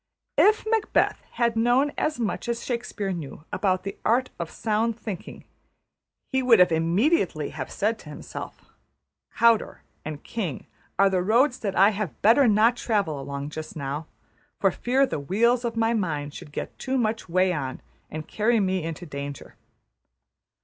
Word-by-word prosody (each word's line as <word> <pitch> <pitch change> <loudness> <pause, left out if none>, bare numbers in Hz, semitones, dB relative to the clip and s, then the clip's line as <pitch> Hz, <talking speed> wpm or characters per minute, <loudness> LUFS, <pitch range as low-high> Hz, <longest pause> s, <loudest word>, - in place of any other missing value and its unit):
If 430 +2 +5
Macheth 440 -1 +1
had 235 -1 +1
known 245 +5 +3
as 305 -4 -1
much 230 +1 -2
as 235 0 -2
Shakespeare 235 -5 -3
knew 155 -3 -7
about 185 -2 +1
the 195 0 -6
art 250 +3 +2
of 170 -2 -3
sound 225 +1 -1
thinking, 205 -6 -7 0.9
he 265 -1 +2
would 245 -5 +6
immediately 180 - +1
have - - -6
said - - 0
to - - -12
himself, - - -8 0.7
``\,`Cawdor' 230 -2 +3 0.2
and 150 -1 -6
`King' 185 - -4 0.3
are 195 - +6
the 185 -1 +2
roads 245 +7 +3
that 200 -3 -3
I 195 +2 +6
had 195 - -4
better 240 +5 +6
not 220 +3 +4
travel 200 - 0
along 140 +1 -5
just 155 0 -7
now, 145 +1 -4 0.5
for - - +3
fear 265 +3 +2
the 205 - -3
wheels 235 - +2
of 230 -1 -3
my 225 +1 +2
mind 150 -9 -2
should 150 - -10
get - - -6
too 265 0 -1
much 225 -5 -1
way 185 +1 +3
on, 135 -5 -4 0.3
and 155 0 -6
carry 225 +2 +2
me 190 -2 +1
into 165 +2 -5
danger.'' 140 -2 -7
210 Hz, 160 wpm, -25 LUFS, 165-235 Hz, 0.9 s, would